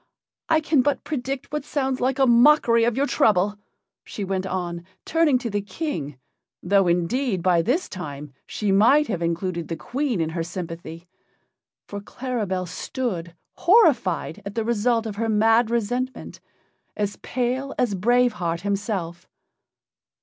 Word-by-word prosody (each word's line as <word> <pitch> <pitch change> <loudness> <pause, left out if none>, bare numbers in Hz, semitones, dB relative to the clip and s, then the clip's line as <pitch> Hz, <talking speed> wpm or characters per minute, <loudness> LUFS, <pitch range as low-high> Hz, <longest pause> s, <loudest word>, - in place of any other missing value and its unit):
I 320 -1 +4
can 305 -3 +3
but 290 +2 0
predict 270 -2 -4
what 300 -1 -2
sounds 270 -3 -2
like 260 +1 +1
a 270 - +4
mockery 240 -1 +5
of 240 0 0
your 280 - +2
trouble," 205 -5 +2 0.4
she 205 - -6
went 190 0 -2
on, 175 -2 -3 0.2
turning 325 -5 +3
to 240 -2 -4
the 205 0 -1
King, 185 - -5 0.5
though 195 +1 +3
indeed 180 +4 0
by 180 -2 +4
this 265 - 0
time 150 -6 -7
she 210 -2 -1
might 240 +10 +5
have 180 -6 -2
included 170 0 -2
the 165 - -3
Queen 245 - -2
in 160 -1 0
her 165 +1 -3
sympathy, 170 0 -7 0.8
for 205 0 -7
Claribel 205 -6 -3
stood, 180 -2 -4 0.2
horrified 290 - +3
at 200 0 -7
the 225 -1 -1
result 230 0 +1
of 210 -2 -5
her 225 +1 -1
mad 225 +2 +3
resentment, 245 +3 -2 0.6
as 205 -1 -2
pale 255 +2 -2
as 240 -5 +1
Brave 240 +5 +3
Heart 170 -1 -1
himself. 195 -4 -3
210 Hz, 150 wpm, -23 LUFS, 180-255 Hz, 0.8 s, mockery